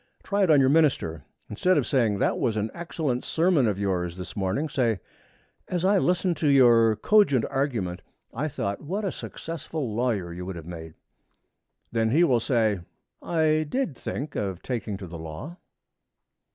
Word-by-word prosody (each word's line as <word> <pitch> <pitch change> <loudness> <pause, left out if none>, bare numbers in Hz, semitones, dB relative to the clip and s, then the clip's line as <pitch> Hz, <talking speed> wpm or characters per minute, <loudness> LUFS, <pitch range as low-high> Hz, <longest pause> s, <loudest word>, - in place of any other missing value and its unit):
Try 205 0 0
it 190 - +3
on 150 -3 +6
your 130 -1 +4
minister. 135 - +2 0.2
Instead 180 - +1
of - - +2
saying, 115 -7 +1
'That - - +1
was 110 -3 0
an 110 +1 -1
excellent 155 -7 -3
sermon 165 -6 +2
of 105 -3 0
yours 90 -3 -1
this 90 -2 -7
morning,' 100 +10 -1
say, 120 -9 0 0.7
'As 180 0 -1
I 200 +1 +4
listened 180 -1 +1
to 155 - 0
your 120 -5 +6
cogent 140 - +3
argument, 115 -11 -1 0.3
I 140 +6 -2
thought 100 -8 -3
what 195 +8 -3
a 190 - 0
successful 155 -6 -5
lawyer 105 -7 -1
you 90 +1 -6
would 95 0 -5
have 85 -2 -8
made.' 80 -2 -8 1.0
Then 115 -1 +1
he 155 +9 +4
will 130 -8 +4
say, 110 -5 +1 0.4
'I 155 -2 +1
did 255 - -1
think 145 +4 -5
of 95 -3 -3
taking 110 -5 -3
to 95 - -8
the 85 -1 -8
law.' 80 - -8
125 Hz, 170 wpm, -26 LUFS, 100-155 Hz, 1.0 s, on